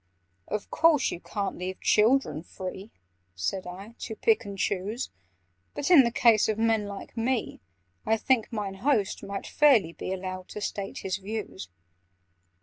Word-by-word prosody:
"Of 210 -1 -4
course 320 -5 +4
you - - -5
can't 200 0 -4
leave 185 +1 -4
children 220 - +3
free," 190 +3 -7 0.5
Said 180 - -2
I, 195 +5 -9
"to 220 - -5
pick 440 - +2
and 200 -1 -7
choose: 205 +6 -2 0.6
But, 290 - -1
in 325 -6 +10
the 235 -2 +1
case 230 -2 +4
of 215 - 0
men 225 -2 +2
like 200 -1 -8
me, 235 +1 -1 0.4
I 225 - +2
think 245 0 +1
'Mine 200 -4 -4
Host' 245 -9 +1
might 200 0 -5
fairly 245 - +4
be - - -5
Allowed 185 -1 -5
to 210 - -7
state 200 -1 -4
his 190 0 -1
views." 200 - -6
210 Hz, 155 wpm, -27 LUFS, 190-230 Hz, 0.6 s, in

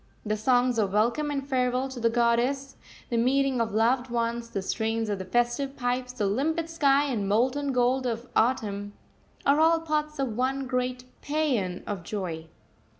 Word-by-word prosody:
The 215 0 0
songs 245 +2 +2
of 200 -3 0
welcome 235 +8 +1
and 275 -1 -3
farewell 255 -1 +1
to 260 -2 -7
the 230 0 +2
goddess, 240 +4 +1 0.4
the 235 - +1
meeting 260 +1 +2
of 225 -1 -1
loved 240 +4 +2
ones, 235 0 -2
the 195 -3 -3
strains 225 +2 -1
of 200 - -2
the 190 - -5
festive 240 +6 0
pipes, 250 0 -1
the 240 -5 -2
limpid 315 +11 0
sky 285 -3 +3
and 225 -9 -2
molten 260 +6 +1
gold 250 +1 +2
of 235 +1 -3
autumn, 205 -4 0 0.5
are 280 +2 +4
all 325 +1 +5
parts 305 -1 -2
of 265 -5 -2
one 265 +2 0
great 250 0 -2 0.2
paean 260 -12 -1
of 200 -3 -4
joy. 170 -4 -5
245 Hz, 170 wpm, -27 LUFS, 225-275 Hz, 0.5 s, all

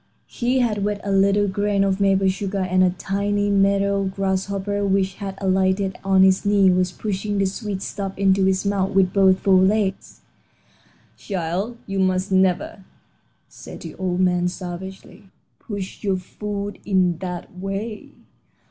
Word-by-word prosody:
He 250 +2 -1
had 210 -4 0
wet 205 0 -1
a 200 - -2
little 200 +1 +3
grain 200 +1 0
of 195 0 0
maple 195 -1 +3
sugar, 195 +1 -2
and 185 0 +2
a 185 - +4
tiny 205 +2 -1
meadow 200 0 +2
grasshopper 195 +1 -2
which 195 -1 +1
had 195 -1 -5
alighted 190 0 +1
on 190 -1 +4
his 190 0 +4
knee 200 -2 +4
was 180 0 +1
pushing 205 +1 -3
the 195 - +2
sweet 195 0 -4
stuff 195 -2 -5
into 195 -1 +3
its 190 +1 0
mouth 195 -1 0
with 190 -2 +3
both 190 -2 +5
fore 190 -2 +4
legs. 195 0 0 1.0
"Child, 195 +5 -3
you 195 -1 -3
must 185 +1 +1
never," 190 0 +1 0.6
said - - -11
the - - -8
old 185 -1 -2
man, 180 -1 +2
savagely, 185 +3 -8 0.3
"push 200 -3 -7
your 195 -2 +1
food 205 +2 -6
in 185 -4 +1
that 180 0 -7
way." 195 +3 -5
195 Hz, 150 wpm, -22 LUFS, 190-200 Hz, 1.0 s, both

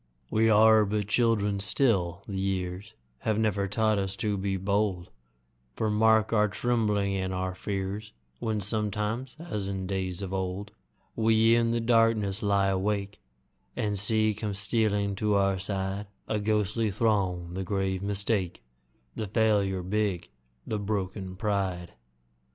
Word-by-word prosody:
We 110 +1 +3
are 110 0 +6
but 105 0 -1
children 105 -3 +2
still, 100 -4 +1
the 95 -2 -3
years 95 +1 -3 0.2
Have 110 -1 0
never 105 -3 +1
taught 110 +1 +1
us 95 0 -2
to 105 0 -1
be 95 0 -1
bold, 95 -2 -1 0.6
For 110 -1 0
mark 110 +1 +3
our 105 -1 +4
trembling 105 -2 0
and 95 -1 -2
our 95 0 -2
fears 100 +2 -4 0.3
When 110 -2 -1
sometimes, 105 +5 -2
as 105 - -3
in 95 -1 -3
days 95 0 -3
of 95 0 -5
old, 95 +2 -3 0.4
We 110 0 +4
in 115 0 +3
the 115 0 +1
darkness 115 -3 +2
lie 100 -2 +2
awake, 100 +1 -1 0.5
And 105 -2 -1
see 110 +1 +2
come 105 -1 -4
stealing 105 0 +1
to 105 0 +1
our 95 -1 +2
side 95 +1 -3 0.2
A 110 - 0
ghostly 105 +1 0
throng 95 -5 0
the 95 +1 -3
grave 95 0 -1
Mistake, 100 - -1 0.5
The 110 - -3
Failure 100 -3 +1
big, 100 -2 -1 0.4
the 110 - -2
broken 95 -2 -3
Pride. 95 -4 -2
100 Hz, 140 wpm, -28 LUFS, 95-110 Hz, 0.6 s, are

